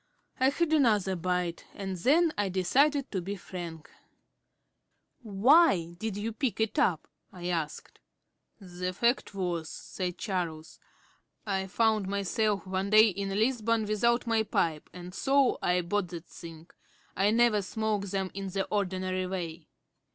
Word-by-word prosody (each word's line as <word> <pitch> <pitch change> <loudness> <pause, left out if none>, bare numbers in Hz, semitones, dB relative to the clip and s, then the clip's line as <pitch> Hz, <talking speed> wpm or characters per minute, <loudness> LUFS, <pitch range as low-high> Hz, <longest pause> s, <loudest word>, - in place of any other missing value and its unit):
I 260 +1 +5
had 315 +3 0
another 210 -10 +3
bite, 180 -1 -2
and 195 -1 -4
then 310 - +3
I 205 -1 0
decided 275 +10 +2
to 190 - -2
be 195 +3 -4
frank. 170 -4 -8 1.3
"Why 215 - +4
did 220 -1 -3
you 215 +2 -3
pick 225 -2 -2
it 220 -1 0
up?" 160 -5 +1 0.2
I 180 -1 -6
asked. 165 -4 -4 0.6
"The 180 -1 -5
fact 235 0 0
was," 175 -4 -2
said 180 -2 -5
Charles, 170 -7 -4 0.7
"I 190 -2 -1
found 215 0 +1
myself 200 +1 0
one 190 +1 -2
day 215 +1 +7
in 195 0 -4
Lisbon 225 +1 +1
without 235 +4 +1
my 225 -1 +2
pipe, 165 -7 -1
and 180 0 -9
so 270 +3 +2
I 180 0 +2
bought 185 +2 -1
that 170 -1 -8
thing; 165 0 -12 0.4
I 195 +2 +3
never 225 -1 +3
smoke 210 +1 -2
them 190 -1 -2
in 195 0 -5
the 195 +1 -2
ordinary 185 -2 -1
way." 170 -4 -5
195 Hz, 145 wpm, -29 LUFS, 180-220 Hz, 1.3 s, day